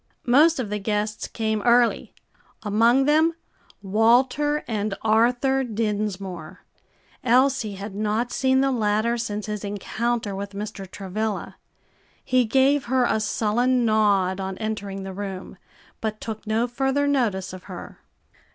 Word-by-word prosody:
Most 300 Hz, +7 st, +5 dB
of 220 Hz, -5 st, -3 dB
the 210 Hz, -, -1 dB
guests 210 Hz, +1 st, -2 dB
came 220 Hz, -2 st, -2 dB
early; 240 Hz, 0 st, +3 dB, 0.5 s
among 230 Hz, +5 st, +3 dB
them, 315 Hz, +3 st, +3 dB, 0.5 s
Walter 250 Hz, +9 st, +2 dB
and 210 Hz, -3 st, -2 dB
Arthur 245 Hz, +5 st, +2 dB
Dinsmore; 200 Hz, -6 st, -4 dB, 0.6 s
Elsie 250 Hz, -3 st, +2 dB
had 195 Hz, +1 st, -7 dB
not 215 Hz, +4 st, -1 dB
seen 265 Hz, 0 st, +2 dB
the 270 Hz, 0 st, +2 dB
latter 220 Hz, 0 st, +1 dB
since 210 Hz, -3 st, -3 dB
his 210 Hz, -1 st, -5 dB
encounter 210 Hz, +1 st, -2 dB
with 200 Hz, +1 st, -6 dB
Mr. 200 Hz, -2 st, -6 dB
Travilla. 205 Hz, +3 st, -4 dB, 0.7 s
He 255 Hz, -1 st, +3 dB
gave 270 Hz, +4 st, +3 dB
her 255 Hz, +1 st, +2 dB
a 220 Hz, -, +1 dB
sullen 240 Hz, +4 st, +1 dB
nod 200 Hz, -4 st, +2 dB
on 190 Hz, 0 st, -4 dB
entering 205 Hz, -3 st, -4 dB
the 190 Hz, 0 st, -6 dB
room, 195 Hz, -1 st, -6 dB, 0.5 s
but 215 Hz, -1 st, -3 dB
took 220 Hz, -1 st, -7 dB
no 220 Hz, +2 st, +1 dB
further 270 Hz, +3 st, 0 dB
notice 215 Hz, -10 st, 0 dB
of 185 Hz, -, -10 dB
her. -, -, -9 dB
220 Hz, 135 wpm, -24 LUFS, 205-245 Hz, 0.7 s, Most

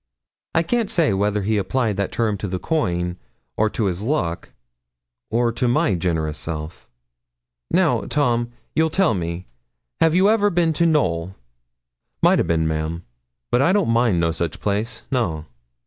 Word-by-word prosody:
I 165 Hz, -, +4 dB
can't 230 Hz, +4 st, 0 dB
say 160 Hz, -, +2 dB
whether 105 Hz, +1 st, 0 dB
he 105 Hz, +1 st, +1 dB
applied 115 Hz, +1 st, 0 dB
that 100 Hz, -1 st, -1 dB
term 110 Hz, -3 st, 0 dB
to 100 Hz, -, -3 dB
the 95 Hz, 0 st, -2 dB
coin, 90 Hz, -, -1 dB, 0.4 s
or 110 Hz, 0 st, +2 dB
to 110 Hz, -, -2 dB
his 95 Hz, -1 st, -1 dB
luck, 105 Hz, -, -2 dB, 0.8 s
or 120 Hz, +1 st, +1 dB
to 120 Hz, +2 st, -1 dB
my 120 Hz, -3 st, +2 dB
generous 80 Hz, -4 st, -1 dB
self. 80 Hz, 0 st, -6 dB, 0.8 s
'Now, -, -, +2 dB
Tom, 120 Hz, -5 st, +1 dB, 0.2 s
you'll 160 Hz, 0 st, +2 dB
tell 190 Hz, -2 st, +2 dB
me, 85 Hz, -1 st, -4 dB, 0.5 s
have 165 Hz, 0 st, +3 dB
you 190 Hz, +2 st, +5 dB
ever 210 Hz, -1 st, +3 dB
been 170 Hz, -3 st, +1 dB
to 170 Hz, +2 st, +2 dB
Knowl?' 95 Hz, -, 0 dB, 0.9 s
'Maught -, -, +5 dB
a' -, -, +3 dB
bin, 80 Hz, -1 st, +1 dB
ma'am, 80 Hz, +2 st, -3 dB, 0.5 s
but 120 Hz, -, +3 dB
I 165 Hz, -, +4 dB
don't 200 Hz, -, +2 dB
mind 115 Hz, -6 st, +2 dB
no 85 Hz, -1 st, +2 dB
sich 80 Hz, -2 st, -3 dB
place 105 Hz, +3 st, -2 dB
no.' 85 Hz, -, -1 dB
105 Hz, 165 wpm, -22 LUFS, -, 0.9 s, you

